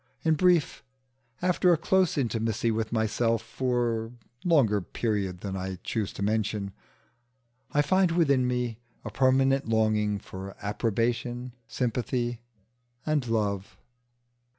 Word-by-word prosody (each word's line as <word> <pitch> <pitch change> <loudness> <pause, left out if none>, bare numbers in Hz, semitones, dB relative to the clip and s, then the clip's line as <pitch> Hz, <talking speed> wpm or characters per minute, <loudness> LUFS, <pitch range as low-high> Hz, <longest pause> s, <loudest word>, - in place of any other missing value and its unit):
In 160 - +3
brief, 175 -1 +2 0.6
after 180 0 +3
a 170 - +4
close 185 +1 +2
intimacy 115 -3 0
with 110 0 -2
myself 115 0 +1
for 120 -1 -1
a 115 - -11 0.3
longer 130 - +3
period 95 -3 -2
than 95 -2 -4
I 95 0 -4
choose 110 -3 -2
to - - -4
mention, 105 -1 -1 1.0
I 145 - +3
find 185 +3 +3
within 140 -7 +3
me 125 -2 -2 0.3
a 110 - -4
permanent 135 +1 +2
longing 110 -2 +2
for 95 0 -8
approbation, 115 +4 -1 0.2
sympathy, 120 0 -2 0.6
and 150 -5 0
love. 105 -3 -1
115 Hz, 120 wpm, -27 LUFS, 105-135 Hz, 1.0 s, a